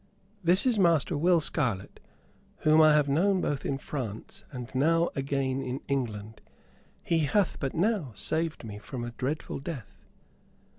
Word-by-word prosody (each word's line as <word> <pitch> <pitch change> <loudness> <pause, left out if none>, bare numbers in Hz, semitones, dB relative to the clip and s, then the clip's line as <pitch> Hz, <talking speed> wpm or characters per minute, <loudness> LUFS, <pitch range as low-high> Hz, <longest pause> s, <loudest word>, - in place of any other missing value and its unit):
"This 180 +6 +4
is 240 -5 +2
Master 170 -2 +3
Will 170 +3 +4
Scarlett, 125 -10 -1 0.6
whom 155 +1 +5
I 155 -1 +7
have 150 -1 +3
known 185 +7 +2
both 145 -5 -2
in 135 - -1
France 120 -7 -6
and 125 -2 -7
now 165 +6 +2
again 135 -1 -1
in 130 0 -4
England. 110 -6 -3 0.6
He 165 - +1
hath 160 +6 +1
but 135 -2 -3
now 185 - +1
saved 160 +8 -1
me 105 -2 -7
from 120 +3 -6
a 120 - -5
dreadful 135 +5 -3
death." 130 - -8
140 Hz, 150 wpm, -28 LUFS, 125-165 Hz, 0.6 s, I